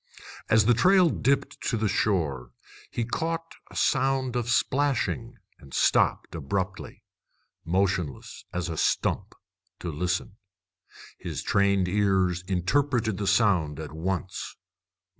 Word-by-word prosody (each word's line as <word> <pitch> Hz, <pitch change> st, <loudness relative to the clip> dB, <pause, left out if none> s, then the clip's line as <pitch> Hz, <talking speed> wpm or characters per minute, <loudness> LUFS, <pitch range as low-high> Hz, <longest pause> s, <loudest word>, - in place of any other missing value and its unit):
As 110 Hz, -1 st, +5 dB
the 120 Hz, -, +5 dB
trail 180 Hz, -, +5 dB
dipped 130 Hz, +7 st, 0 dB
to 115 Hz, -, 0 dB
the 110 Hz, 0 st, 0 dB
shore 75 Hz, -, 0 dB, 0.4 s
he 120 Hz, -, -2 dB
caught 165 Hz, +6 st, -3 dB, 0.2 s
a -, -, -14 dB
sound 130 Hz, -1 st, +1 dB
of 120 Hz, -1 st, -1 dB
splashing, 125 Hz, -2 st, 0 dB, 0.2 s
and 70 Hz, -, -11 dB
stopped -, -, +2 dB
abruptly, 95 Hz, +5 st, -4 dB, 0.6 s
motionless 90 Hz, -5 st, -1 dB
as 90 Hz, -1 st, -3 dB
a 80 Hz, -2 st, -4 dB
stump, -, -, 0 dB, 0.4 s
to 85 Hz, -, -4 dB
listen. 90 Hz, +5 st, -2 dB, 0.8 s
His -, -, -5 dB
trained 100 Hz, -2 st, +2 dB
ears 95 Hz, -2 st, +1 dB
interpreted 110 Hz, +4 st, +1 dB
the 100 Hz, -, -2 dB
sound 95 Hz, -8 st, +2 dB
at 80 Hz, -, -6 dB
once. 95 Hz, +5 st, -4 dB
100 Hz, 120 wpm, -27 LUFS, 90-120 Hz, 0.8 s, As